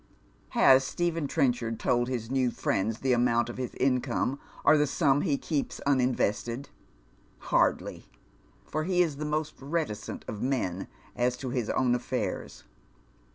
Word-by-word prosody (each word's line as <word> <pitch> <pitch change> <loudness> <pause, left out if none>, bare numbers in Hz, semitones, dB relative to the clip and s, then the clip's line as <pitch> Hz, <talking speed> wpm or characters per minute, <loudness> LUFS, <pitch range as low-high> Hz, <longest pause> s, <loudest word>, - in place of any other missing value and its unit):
Has 130 0 +7
Stephen 165 +1 -1
Trenchard 120 -4 0
told 120 0 +1
his 120 -2 -3
new 130 -2 +2
friends 110 -1 -1
the 130 -1 +2
amount 120 -1 +2
of 120 - -7
his 125 - -4
income, 130 +1 0 0.3
or - - +7
the 150 -1 +3
sum 140 0 +2
he 140 - +1
keeps 145 -2 -2
un 140 -2 +3
invested? 120 +1 -1 0.7
Hardly, - - 0 0.6
for 155 +1 -2
he 180 0 +3
is 155 -5 -3
the 150 - -3
most 155 0 -1
reticent 140 -8 -3
of 105 - -5
men 110 -9 -1 0.3
as 125 0 +1
to 130 -1 -5
his 120 -3 -1
own 125 -2 +2
affairs. 125 0 -3
130 Hz, 150 wpm, -28 LUFS, 120-145 Hz, 0.7 s, Has